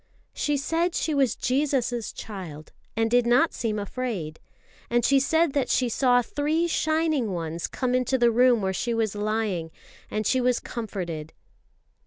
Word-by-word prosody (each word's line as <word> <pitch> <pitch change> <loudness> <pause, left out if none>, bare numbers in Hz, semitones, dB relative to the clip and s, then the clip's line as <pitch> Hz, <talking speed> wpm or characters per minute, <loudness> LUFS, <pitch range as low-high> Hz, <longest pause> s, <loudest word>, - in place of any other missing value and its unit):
"She 295 -1 0
said 330 +5 0
she 315 - 0
was 270 -5 +2
Jesus' 255 -3 0
child, 175 -8 -8 0.3
and 225 0 +1
did 245 -1 +3
not 250 +7 +4
seem 220 -3 -2
afraid. 200 -7 -4 0.5
And 240 0 +2
she 275 0 +5
said 320 +2 +2
that 280 -3 0
she 250 -2 +2
saw 245 +1 +3
three 305 +7 0
Shining 315 -6 +1
Ones 165 -1 -3
come 255 -1 -2
into 255 +1 +1
the 240 -1 +4
room 245 -2 +4
where 190 0 0
she 235 +5 -1
was 220 -3 0
lying, 210 -5 -1 0.4
and 215 0 -2
she 260 +4 +2
was 250 -1 +2
comforted." 175 -9 -5
240 Hz, 160 wpm, -26 LUFS, 210-270 Hz, 0.5 s, she